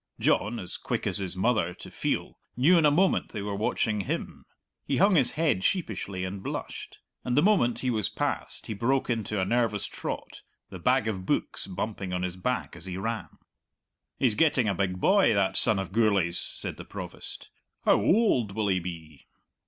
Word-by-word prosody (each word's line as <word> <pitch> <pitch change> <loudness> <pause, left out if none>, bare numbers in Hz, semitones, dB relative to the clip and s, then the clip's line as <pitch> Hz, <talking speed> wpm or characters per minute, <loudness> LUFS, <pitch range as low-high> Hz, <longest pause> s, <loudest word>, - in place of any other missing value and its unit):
John, 110 +4 +2
as 90 - -3
quick - - -3
as - - +1
his 95 -2 -3
mother 95 -4 +1
to - - -11
feel, - - -2 0.2
knew 150 +9 +5
in 160 -3 +5
a - - +6
moment 180 +6 +2
they 105 -3 -4
were 100 0 -3
watching 105 +1 0
him. 95 - -4 0.4
He - - -1
hung 200 +2 +5
his 140 -8 +5
head 150 - +1
sheepishly 100 - -1
and 95 +1 -5
blushed, - - -6 0.3
and 125 +1 -1
the 145 - +5
moment 185 - +3
he 125 - +2
was 110 -4 0
past - - -2
he - - -4
broke 125 +5 0
into 110 -3 -2
a 95 - +1
nervous 110 -2 +1
trot, - - -6 0.3
the 95 - -7
bag 125 +3 +2
of 95 -4 -3
books - - -1
bumping 95 0 -4
on 90 0 -1
his 90 -1 -3
back 125 +4 -2
as 85 +2 -8
he 90 -1 -4
ran. 115 +3 -3 0.9
"He's 125 -5 +3
getting 140 -3 +3
a 100 - +2
big 90 -1 -1
boy, 190 - +4
that 95 -1 +1
son 110 -4 +4
of 95 -2 -3
Gourlay's," 100 -6 +2
said - - -5
the - - -9
Provost; - - -8 0.3
"how - - +5
oald 125 - +3
will 105 -1 0
he 95 -1 +2
be?" 80 -4 -9
105 Hz, 190 wpm, -27 LUFS, 95-125 Hz, 0.9 s, a